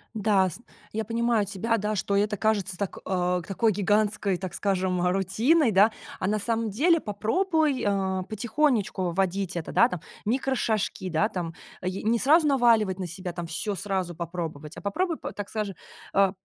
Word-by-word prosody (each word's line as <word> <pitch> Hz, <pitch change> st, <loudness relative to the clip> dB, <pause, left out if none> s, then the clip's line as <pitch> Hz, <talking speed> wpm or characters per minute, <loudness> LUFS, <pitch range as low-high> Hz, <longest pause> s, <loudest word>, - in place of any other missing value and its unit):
Да, 200 Hz, -3 st, +3 dB
сн 235 Hz, -, -11 dB, 0.3 s
я 220 Hz, +1 st, -1 dB
понимаю 230 Hz, -1 st, +1 dB
тебя, 205 Hz, +4 st, -1 dB
да, 210 Hz, 0 st, -1 dB
что 200 Hz, 0 st, -1 dB
это 210 Hz, +1 st, +1 dB
кажется 200 Hz, -4 st, 0 dB
так 200 Hz, -1 st, -4 dB
э, 180 Hz, -1 st, 0 dB
такой 215 Hz, +2 st, +1 dB
гигантской, 205 Hz, -1 st, +1 dB
так 185 Hz, -1 st, -6 dB
скажем, 185 Hz, -2 st, 0 dB
рутиной, 220 Hz, -, +3 dB
да, 205 Hz, +3 st, +5 dB, 0.3 s
а 185 Hz, -, 0 dB
на 210 Hz, +2 st, +1 dB
самом 225 Hz, +1 st, -1 dB
деле 320 Hz, -, +3 dB
попробуй, 295 Hz, -, 0 dB
а, 190 Hz, -2 st, 0 dB
потихонечку 215 Hz, -, 0 dB
вводить 190 Hz, 0 st, -1 dB
это, 165 Hz, -, -5 dB
да, 235 Hz, -, +5 dB
там, 180 Hz, -, -4 dB, 0.3 s
микрошажки, 225 Hz, -5 st, 0 dB
да, 165 Hz, +5 st, +2 dB
там, 175 Hz, -6 st, -4 dB, 0.3 s
ае 185 Hz, +1 st, -3 dB
не 225 Hz, +2 st, +2 dB
сразу 300 Hz, +6 st, +4 dB
наваливать 230 Hz, -8 st, +3 dB
на 185 Hz, -, -4 dB
себя, 175 Hz, +1 st, -6 dB
там, 175 Hz, -1 st, -5 dB
всё 195 Hz, +5 st, -3 dB
сразу 190 Hz, -3 st, -2 dB
попробовать, 165 Hz, -3 st, -5 dB
а -, -, -7 dB
попробуй, 325 Hz, -, -1 dB
п -, -, -6 dB
так 205 Hz, -1 st, -6 dB
скажем, 210 Hz, -3 st, -3 dB, 0.4 s
а, 195 Hz, -1 st, +4 dB
200 Hz, 170 wpm, -26 LUFS, 185-225 Hz, 0.4 s, да